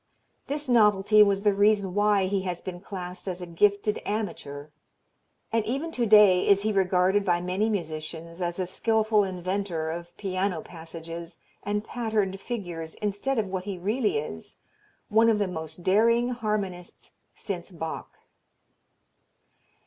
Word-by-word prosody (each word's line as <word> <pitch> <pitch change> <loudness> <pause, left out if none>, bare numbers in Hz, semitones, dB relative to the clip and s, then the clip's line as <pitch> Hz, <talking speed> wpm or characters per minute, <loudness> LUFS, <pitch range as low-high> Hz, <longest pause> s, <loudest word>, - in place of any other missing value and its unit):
This 290 0 -3
novelty 210 -3 +5
was 200 -1 +4
the 205 -1 +4
reason 200 -2 +3
why 205 -1 +3
he 195 +1 0
has 180 -2 -3
been 180 -2 -7
classed 185 -1 -7
as 180 -1 -3
a 180 - -5
"gifted 200 +4 +1
amateur" 160 -9 -4 0.8
and 225 -1 +2
even 275 +9 -2
to 240 -6 0
day 205 -4 +6
is 200 0 +5
he 215 0 +1
regarded 190 +1 +3
by 175 -3 +2
many 185 +5 0
musicians 165 -2 -5
as 175 -1 -2
a 185 - -1
skilful 220 +3 +2
inventor 185 -3 -2
of 170 +1 -8
piano 185 -3 -1
passages 165 +1 -8 0.2
and 210 0 -2
patterned 215 -5 -1
figures 175 -9 -5
instead 210 +6 -2
of 220 - +1
what 185 -1 -4
he 200 -2 -4
really 210 - 0
is 115 - -6 0.5
one 225 +2 +5
of 220 - +3
the 205 -2 0
most 160 -1 -7
daring 230 +6 +3
harmonists 210 -7 -4 0.2
since 185 -3 -5
Bach. 160 -2 -6
195 Hz, 145 wpm, -27 LUFS, 175-210 Hz, 0.8 s, day